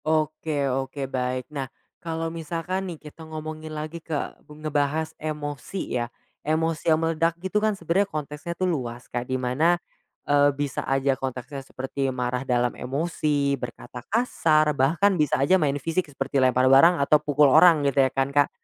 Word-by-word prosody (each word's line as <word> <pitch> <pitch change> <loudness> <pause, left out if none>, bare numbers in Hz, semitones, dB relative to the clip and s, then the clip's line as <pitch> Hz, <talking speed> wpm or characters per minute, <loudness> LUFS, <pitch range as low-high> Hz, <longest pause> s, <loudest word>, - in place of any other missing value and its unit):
Oke 155 -1 0
oke 135 +1 -2
baik 130 -1 -2
nah 135 -3 -4 0.3
kalau 165 0 -3
misalkan 170 +4 -3
nih 170 - -6
kita 150 +2 -13
ngomongin 155 0 -6
lagi 155 +2 -6
ke 160 -2 -3 0.3
ngebahas 150 +1 -1
emosi 150 +3 -4
ya, 120 - -3 0.3
emosi 160 +1 0
yang 155 - +5
meledak 165 +1 0
gitu 190 +4 -1
kan 215 -2 +1
sebenarnya 190 +4 +1
konteksnya 150 +1 -5
tuh 185 - 0
luas 125 -8 -3
kayak 120 +1 -5
di 130 - 0
mana, 135 +8 +2 0.5
eee, 145 0 +4
bisa 145 -2 -2
aja 135 0 +2
konteksnya 130 +1 -5
seperti 135 +1 -3
marah 125 -1 -2
dalam 125 -2 +1
emosi, 145 0 -1
berkata 125 0 -7
kasar 160 -9 +2
bahkan 165 +9 +3
bisa 150 - +2
aja 165 +7 +3
main 145 -2 +1
fisik 165 +3 -2
seperti 135 -1 -1
lempar 130 0 +3
barang 140 +7 +7
atau 150 +1 +4
pukul 150 0 +3
orang 165 -5 +6
gitu 140 0 +3
ya 130 - +3
kan 135 +2 -1
Kak, 145 0 +4
150 Hz, 165 wpm, -25 LUFS, 135-165 Hz, 0.5 s, barang